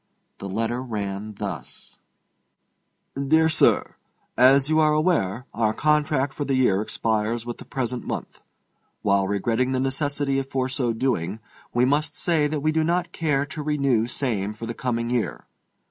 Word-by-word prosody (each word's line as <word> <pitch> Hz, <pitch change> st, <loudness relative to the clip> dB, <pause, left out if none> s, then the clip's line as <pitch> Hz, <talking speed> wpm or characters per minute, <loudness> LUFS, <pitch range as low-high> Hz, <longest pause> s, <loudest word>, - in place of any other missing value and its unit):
The 100 Hz, -, -6 dB
letter 115 Hz, +5 st, -1 dB
ran 105 Hz, -3 st, -4 dB
thus: 95 Hz, -10 st, -7 dB, 1.1 s
DEAR 155 Hz, +4 st, +3 dB
SIR: 155 Hz, -1 st, +2 dB, 0.4 s
As 135 Hz, +2 st, +5 dB
you 155 Hz, +1 st, +3 dB
are 155 Hz, -1 st, +4 dB
aware, 145 Hz, -, +1 dB
our 110 Hz, -1 st, +1 dB
contract 150 Hz, -2 st, +1 dB
for 145 Hz, -, -3 dB
the 140 Hz, -1 st, 0 dB
year 115 Hz, -7 st, +3 dB
expires 110 Hz, +1 st, -1 dB
with 120 Hz, -1 st, -6 dB
the -, -, -10 dB
present 125 Hz, -2 st, -3 dB
month. -, -, -5 dB, 0.6 s
While 100 Hz, -1 st, +2 dB
regretting 115 Hz, +6 st, 0 dB
the 130 Hz, -, +1 dB
necessity 140 Hz, +1 st, 0 dB
for 130 Hz, -1 st, -2 dB
so 125 Hz, -2 st, 0 dB
doing, 110 Hz, -5 st, -1 dB, 0.3 s
we 120 Hz, +1 st, +3 dB
must 145 Hz, +2 st, +1 dB
say 160 Hz, -3 st, +1 dB
that 150 Hz, -1 st, -2 dB
we 155 Hz, +2 st, +2 dB
do 160 Hz, 0 st, +1 dB
not 175 Hz, +1 st, 0 dB
care 150 Hz, -5 st, 0 dB
to 150 Hz, +2 st, -7 dB
renew 140 Hz, -6 st, +1 dB
same 110 Hz, -6 st, -2 dB
for 115 Hz, -, -7 dB
the 115 Hz, -, -4 dB
coming 115 Hz, 0 st, -2 dB
year. 120 Hz, -3 st, -2 dB
130 Hz, 160 wpm, -24 LUFS, 110-145 Hz, 1.1 s, As